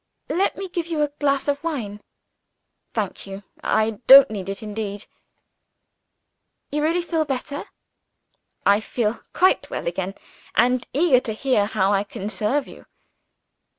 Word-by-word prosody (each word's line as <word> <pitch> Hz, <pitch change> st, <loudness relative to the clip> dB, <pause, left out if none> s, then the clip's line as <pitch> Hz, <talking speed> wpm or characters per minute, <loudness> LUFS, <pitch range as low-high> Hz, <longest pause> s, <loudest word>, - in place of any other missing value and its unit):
"Let 380 Hz, +4 st, +1 dB
me 390 Hz, -, -5 dB
give 350 Hz, -2 st, -4 dB
you 320 Hz, -3 st, 0 dB
a 295 Hz, -, 0 dB
glass 280 Hz, -1 st, +1 dB
of 285 Hz, +1 st, -1 dB
wine." 225 Hz, -11 st, -4 dB, 0.9 s
"Thank -, -, -4 dB
you 195 Hz, +1 st, -8 dB, 0.2 s
I 220 Hz, -1 st, +1 dB
don't 270 Hz, -3 st, +10 dB
need 195 Hz, -3 st, -5 dB
it 195 Hz, +3 st, -5 dB
indeed." 210 Hz, -1 st, -5 dB, 1.7 s
"You 295 Hz, +1 st, -1 dB
really 335 Hz, +3 st, +1 dB
feel 330 Hz, -2 st, 0 dB
better?" 285 Hz, 0 st, -4 dB, 1.0 s
"I 200 Hz, +1 st, +5 dB
feel 220 Hz, 0 st, -2 dB
quite 375 Hz, +1 st, +3 dB
well -, -, -4 dB
again 185 Hz, +3 st, -3 dB, 0.4 s
and 250 Hz, +2 st, +2 dB
eager 285 Hz, -2 st, +4 dB
to 225 Hz, -3 st, -4 dB
hear 220 Hz, -3 st, +1 dB
how 205 Hz, -2 st, +1 dB
I 200 Hz, 0 st, +2 dB
can 205 Hz, 0 st, -6 dB
serve 260 Hz, +7 st, 0 dB
you." -, -, -14 dB
245 Hz, 145 wpm, -23 LUFS, 205-295 Hz, 1.7 s, don't